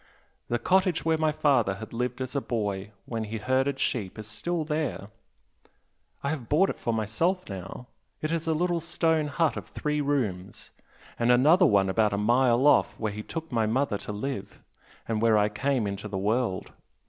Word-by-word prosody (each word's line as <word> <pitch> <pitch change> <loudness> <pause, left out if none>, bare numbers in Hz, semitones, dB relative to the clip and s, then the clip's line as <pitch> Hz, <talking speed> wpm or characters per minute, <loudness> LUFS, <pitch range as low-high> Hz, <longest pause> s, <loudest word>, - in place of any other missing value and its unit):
The 120 - 0
cottage 185 +3 +2
where 160 -1 +2
my 155 -1 +2
father 130 -10 +2
had 110 +3 -9
lived 125 +2 -2
as 130 +2 -4
a 140 - +1
boy 105 -4 -3
when 115 -2 -3
he 110 +1 -4
herded 130 +4 0
sheep 105 -8 -2
is 110 - -7
still 160 +11 -2
there 150 -9 -3 1.1
I 140 - 0
have 135 -7 -5
bought 185 +7 +4
it - - -10
for 120 - -1
myself 115 - 0
now, 95 +5 -7 0.3
it 155 - -2
is 165 0 -2
a 160 - +2
little 175 +1 +1
stone 160 -2 +1
hut 155 +2 0
of - - -6
three 150 0 -2
rooms, 115 -11 -2 0.5
and 120 +1 +3
another 155 +9 +6
one 100 -6 +3
about 105 +2 +2
a - - 0
mile 120 +4 +3
off 145 - +4
where 110 -2 -2
he 105 - -5
took 160 +7 -6
my 115 -3 +1
mother 115 -2 0
to 105 - -6
live, 105 +1 -5 0.5
and 110 -1 -1
where 115 -2 +4
I 105 0 +3
came 130 +2 0
into 100 +1 -4
the 100 -2 -4
world! 105 0 -1
125 Hz, 190 wpm, -27 LUFS, 105-150 Hz, 1.1 s, another